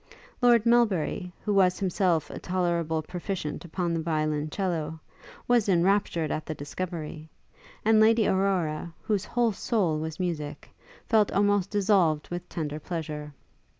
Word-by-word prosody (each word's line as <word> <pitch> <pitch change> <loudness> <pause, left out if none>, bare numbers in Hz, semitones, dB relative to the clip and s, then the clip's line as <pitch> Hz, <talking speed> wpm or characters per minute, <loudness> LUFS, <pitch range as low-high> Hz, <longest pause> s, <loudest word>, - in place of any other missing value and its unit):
Lord 240 -2 +5
Melbury, 205 -7 +2
who 210 - +1
was 185 -2 +4
himself 180 -5 0
a - - -6
tolerable 170 -3 -1
proficient 180 -1 -4
upon 170 0 -2
the 165 - 0
violoncello, 155 +1 -1 0.5
was 240 -4 +3
enraptured 175 -3 +2
at 155 - -3
this 155 - -4
discovery; 155 0 -6 0.6
and 220 0 +5
Lady 220 0 +5
Aurora, 175 -4 0
whose 205 -3 0
whole 240 -2 +1
soul 190 -7 0
was 160 0 -5
music, 150 -5 -4 0.3
felt 215 -3 +3
almost 205 -1 +2
dissolved 190 -7 +2
with 175 0 -6
tender 150 -2 -4
pleasure. 155 -3 -5
175 Hz, 130 wpm, -27 LUFS, 155-200 Hz, 0.6 s, Lord